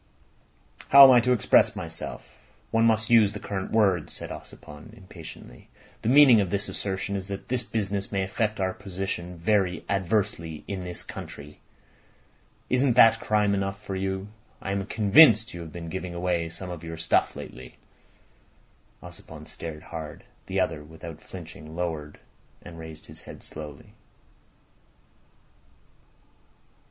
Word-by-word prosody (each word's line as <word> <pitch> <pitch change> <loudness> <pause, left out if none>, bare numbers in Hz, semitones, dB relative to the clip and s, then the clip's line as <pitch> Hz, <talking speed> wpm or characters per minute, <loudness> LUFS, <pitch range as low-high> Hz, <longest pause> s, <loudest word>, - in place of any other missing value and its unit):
"How 140 0 +11
am 135 - +10
I 125 - +7
to 125 +2 +1
express 120 -5 +4
myself? - - -8 0.3
One 115 0 +3
must 110 0 +1
use 110 -3 +6
the 105 - -6
current 95 -2 -4
words," 95 -7 +2
said - - -7
Ossipon 75 0 -11
impatiently. 95 -4 -12 0.3
"The 110 - -1
meaning 130 -5 +7
of 95 - -2
this 100 +2 -1
assertion 100 0 -3
is 95 -1 -4
that 100 -1 -7
this 125 -1 +1
business 100 -4 -3
may 100 -2 0
affect 105 +3 -2
our 95 -1 0
position 90 -2 -5
very 90 0 0
adversely 100 -5 -1
in 100 -2 -4
this 90 -1 -6
country. 75 +1 -10 1.1
Isn't 130 0 +2
that 115 -2 +7
crime 105 -1 +1
enough 95 0 -2
for 95 - -5
you? 95 +1 -3 0.3
I 95 - -4
am 100 0 -2
convinced 110 - +6
you 85 - -7
have 80 -2 -9
been 85 0 -7
giving 90 0 -5
away 85 -1 -1
some 90 +2 -7
of 85 -2 -8
your 80 0 -6
stuff 80 - +1
lately." 60 0 -10 1.3
Ossipon - - -11
stared 80 -2 -8
hard. 80 -2 -8 0.2
The - - -1
other, 75 - -2
without 80 +1 -10
flinching, 80 -3 -10
lowered 80 -4 -4 0.4
and 85 -1 -11
raised 80 -1 -10
his - - -13
head - - -12
slowly. 75 -2 -10
95 Hz, 145 wpm, -26 LUFS, 85-105 Hz, 1.3 s, How